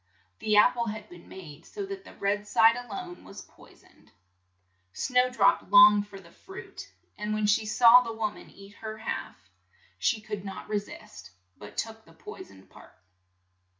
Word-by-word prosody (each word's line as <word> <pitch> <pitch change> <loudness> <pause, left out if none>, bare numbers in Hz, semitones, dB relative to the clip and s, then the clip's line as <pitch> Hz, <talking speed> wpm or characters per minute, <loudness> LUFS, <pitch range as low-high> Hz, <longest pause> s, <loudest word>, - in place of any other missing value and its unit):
The 215 -1 +1
ap 210 - +6
ple 235 -1 -3
had 215 0 -7
been 175 -1 -15
made 155 -6 -12
so 405 -1 -7
that 390 -1 -8
the - - -14
red 205 +1 -2
side 225 +2 +5
a 245 0 -8
lone 185 -4 -8
was - - -11
poi - - -20
soned. - - -25 0.9
Snow 250 -1 +1
drop 200 -5 +2
longed 205 0 +7
for 195 -1 -12
the 170 -3 -18
fruit, 385 - -12 0.3
and 210 0 -2
when 215 0 -1
she 215 +1 +1
saw 235 +3 +7
the 235 -2 -5
wom 220 -1 -3
an - - -14
eat 200 +1 -15
her 220 -1 -7
half, 220 - -6 0.5
she 230 - +1
could 210 -2 -7
not 195 -1 -8
re 210 -1 -1
sist, 200 - -13 0.3
but 105 - -13
took 225 0 -5
the 165 - -20
poi 160 - -11
soned 95 -1 -15
part. 65 +1 -17
210 Hz, 185 wpm, -27 LUFS, 195-225 Hz, 0.9 s, longed